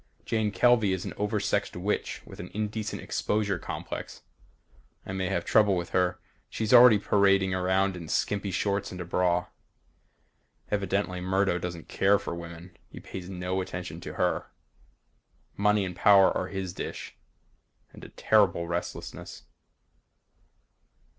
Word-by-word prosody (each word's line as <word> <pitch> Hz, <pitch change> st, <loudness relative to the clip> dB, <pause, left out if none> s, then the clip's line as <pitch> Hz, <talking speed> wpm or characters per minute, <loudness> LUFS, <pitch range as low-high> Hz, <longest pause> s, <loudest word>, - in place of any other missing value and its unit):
Jane 110 Hz, -2 st, 0 dB
Kelvey 110 Hz, -2 st, +3 dB
is 95 Hz, -, -3 dB
an -, -, -5 dB
oversexed 105 Hz, -1 st, -1 dB
witch 95 Hz, +4 st, -2 dB
with -, -, -12 dB
an 90 Hz, -, -7 dB
indecent 110 Hz, 0 st, -3 dB
exposure 105 Hz, -3 st, -1 dB
complex. -, -, -7 dB, 0.8 s
I -, -, -6 dB
may 95 Hz, -1 st, -2 dB
have 85 Hz, -3 st, -1 dB
trouble 105 Hz, -3 st, +4 dB
with 85 Hz, 0 st, -4 dB
her. 90 Hz, -1 st, +1 dB, 0.6 s
Already 120 Hz, -3 st, +9 dB
she's 100 Hz, -, -12 dB
parading 100 Hz, -2 st, +3 dB
around 95 Hz, +1 st, +1 dB
in 85 Hz, -3 st, -8 dB
skimpy 100 Hz, +5 st, -1 dB
shorts 100 Hz, +2 st, -1 dB
and 90 Hz, -, -8 dB
a 85 Hz, -, -4 dB
bra. 90 Hz, 0 st, +1 dB, 1.3 s
Evidently 100 Hz, -2 st, -1 dB
Murdo 95 Hz, -1 st, +1 dB
doesn't 85 Hz, -2 st, -6 dB
care 100 Hz, +1 st, +3 dB
for 100 Hz, -3 st, -5 dB
women. 85 Hz, +1 st, -9 dB
He -, -, -10 dB
pays 95 Hz, -1 st, -8 dB
no 90 Hz, 0 st, -2 dB
attention 90 Hz, -1 st, -6 dB
to -, -, -7 dB
her. -, -, 0 dB, 1.1 s
Money 105 Hz, 0 st, +2 dB
and 90 Hz, -1 st, -6 dB
power 100 Hz, -2 st, +6 dB
are 90 Hz, -, -1 dB
his 95 Hz, -2 st, -5 dB
dish. -, -, -6 dB, 0.8 s
And -, -, -13 dB
a -, -, -9 dB
terrible 95 Hz, -5 st, +2 dB
restlessness. 85 Hz, +1 st, -5 dB
95 Hz, 140 wpm, -28 LUFS, 90-100 Hz, 1.3 s, Already